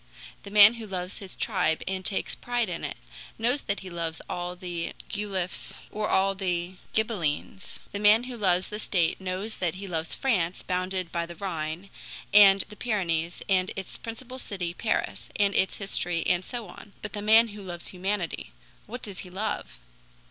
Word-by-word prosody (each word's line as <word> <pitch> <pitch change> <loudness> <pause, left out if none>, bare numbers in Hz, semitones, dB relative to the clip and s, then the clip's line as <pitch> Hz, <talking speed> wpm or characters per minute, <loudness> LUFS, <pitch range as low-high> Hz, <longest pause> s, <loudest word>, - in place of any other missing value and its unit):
The - - -9
man 205 +1 +9
who 230 -2 -7
loves 185 -1 -4
his 195 -2 -7
tribe 160 - +1
and 190 0 -2
takes 195 - -1
pride 240 -3 0
in 170 - -4
it, - - -4 0.4
knows 245 +5 +1
that 200 - -2
he 190 - -7
loves 165 -1 -3
all 175 0 -3
the 175 -2 -4 0.2
Guelphs 195 -3 -2 0.2
or 210 0 -1
all 195 +1 +3
the 180 -1 -2 0.2
Ghibellines; 195 -5 -1
the 200 - -3
man 210 +3 +6
who 250 0 -6
loves 185 -4 +2
the 210 - -4
state 180 -4 +1
knows 190 +4 -3
that 175 -2 0
he 195 +2 -6
loves 165 -2 -1
France 185 -10 +1
bounded 185 -1 -1
by 170 -1 -1
the 170 - -8
Rhine, 170 0 -4 0.4
and 200 -1 +9
the 210 - -10
Pyrenees, 175 -7 -1
and 185 -1 +3
its 190 -1 -6
principal 250 +3 -6
city 180 -7 -3
Paris, 220 +5 -1
and 200 -1 +3
its 190 - +2
history 175 -4 0
and 175 +1 +3
so 235 0 -5
on. 200 +3 -12
But 215 - -5
the 205 - -3
man 220 +2 +6
who 205 0 -9
loves 175 -3 -5
humanity 180 - -2 0.3
what 245 +4 -7
does 200 -4 -6
he 185 - -7
love? 185 - -3
190 Hz, 180 wpm, -28 LUFS, 175-210 Hz, 0.4 s, man